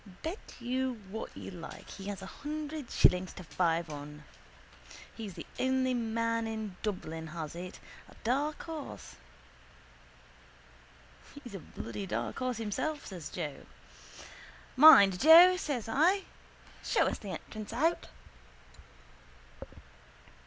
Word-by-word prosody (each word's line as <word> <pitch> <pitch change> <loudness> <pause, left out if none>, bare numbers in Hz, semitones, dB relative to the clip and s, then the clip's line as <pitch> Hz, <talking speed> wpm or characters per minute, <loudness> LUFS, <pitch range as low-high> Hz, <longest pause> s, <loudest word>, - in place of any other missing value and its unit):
Bet 330 +6 -6
you 255 0 -2
what 220 - -6
you - - -7
like 170 -3 -9
he 195 - -9
has 200 -1 -5
a 190 - -10
hundred 300 -2 -5
shillings 180 0 +3
to 185 - -9
five 170 -1 0
on. 150 0 -8 0.9
He's 210 -6 -7
the - - -7
only 260 0 +2
man 230 -1 0
in 220 -3 -5
Dublin 165 -6 -4
has 155 -1 -6
it. 180 +1 -7 0.3
A - - -16
dark 280 +6 0
horse. 320 -3 -8 2.3
—He's 240 -5 -10
a 195 - -5
bloody 105 - -7
dark 110 +1 -3
horse 255 -1 -1
himself, 255 +8 -3
says 180 -6 -7
Joe. 145 -3 -6 1.1
—Mind, 200 -11 +9
Joe, 340 +4 +9
says 280 - -3
I. 350 - +3 0.6
Show - - +2
us - - -1
the - - -8
entrance 215 -1 -7
out. 315 +9 +1
225 Hz, 120 wpm, -31 LUFS, 180-280 Hz, 2.3 s, Mind